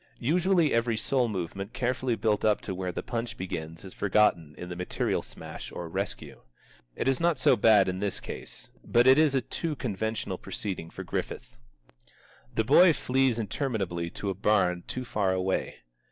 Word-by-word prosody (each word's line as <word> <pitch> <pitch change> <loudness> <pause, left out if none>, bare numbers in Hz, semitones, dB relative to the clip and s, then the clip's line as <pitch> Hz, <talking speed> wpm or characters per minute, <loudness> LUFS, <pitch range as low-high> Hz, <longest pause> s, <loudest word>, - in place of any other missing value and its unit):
Usually 170 +3 +2
every 115 -1 +1
soul 125 +2 +1
movement 95 +1 -4
carefully 130 -1 0
built 105 -1 0
up 105 -1 +3
to 95 - -4
where 90 0 -3
the - - -5
punch 115 0 -4
begins 80 -1 -6
is 95 - -9
forgotten 90 -7 +2
in 90 - -7
the 90 - -6
material 90 +1 -1
smash - - -9
or 85 - -6
rescue. 80 - -5 0.5
It - - -2
is 135 -1 +2
not 170 -1 +2
so - - +4
bad 105 -3 +5
in 95 0 -2
this 100 -1 -2
case, - - -9
but 120 +1 +3
it 130 +3 +7
is 155 -3 +4
a 135 - +3
too 160 +3 -3
conventional 110 -3 -3
proceeding 95 -5 -4
for - - -8
Griffith. - - -5 1.0
The 110 - +2
boy 165 +8 +7
flees 130 -3 +1
interminably 100 - -2
to 100 +3 -4
a - - -2
barn 90 -3 +1
too 125 0 -4
far 100 -5 0
away. 95 -6 -2
105 Hz, 175 wpm, -28 LUFS, 95-130 Hz, 1.0 s, it